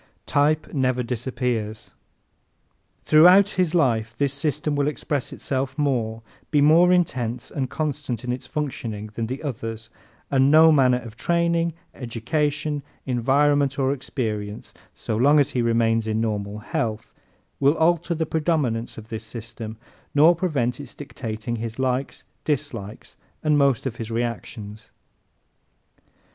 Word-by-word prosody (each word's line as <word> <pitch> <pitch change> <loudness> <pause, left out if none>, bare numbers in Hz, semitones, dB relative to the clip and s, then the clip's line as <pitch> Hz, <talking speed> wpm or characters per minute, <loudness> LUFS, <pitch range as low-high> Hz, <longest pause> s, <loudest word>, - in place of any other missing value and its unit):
Type 150 +2 +1
Never 130 -3 +1
Disappears 120 -3 -3 1.1
¶ - - -38
Throughout 180 +6 +7
his 180 -4 0
life 115 -8 +1
this 140 -1 +1
system 145 +1 -1
will 145 0 +1
express 145 -2 -2
itself 130 -1 -3
more, 115 -6 -1 0.3
be 150 - +3
more 165 +5 +6
intense 125 -10 0
and 130 -3 -2
constant 145 -6 -3
in 125 - -2
its 125 0 -5
functioning 115 -8 -4
than 115 +1 -3
the 130 +5 -5
others 115 -5 -5 0.4
and 135 0 +4
no 160 +2 +7
manner 130 -4 +4
of 115 -2 -10
training, 170 +3 +1 0.2
education, 145 +5 -2 0.2
environment 140 +3 +2
or 135 0 +2
experience, 110 -6 -4 0.2
so 110 - -3
long 145 +6 +5
as 145 0 +2
he 125 - 0
remains 115 -1 +2
in 110 0 0
normal 105 -2 -2
health, 110 0 -3 0.5
will 140 +3 +3
alter 170 +1 +2
the 160 0 -1
predominance 150 -8 -1
of 110 0 -10
this 110 -1 -5
system 115 -1 -8 0.4
nor 160 +4 +7
prevent 140 -9 -1
its 140 -4 -9
dictating 115 -4 -5
his 115 0 -5
likes, 130 +1 -2 0.2
dislikes 130 -9 -4 0.3
and 155 -1 +3
most 140 -4 +2
of 120 -3 -3
his 115 -1 -5
reactions. 115 -2 -5
130 Hz, 135 wpm, -24 LUFS, 115-150 Hz, 1.1 s, Throughout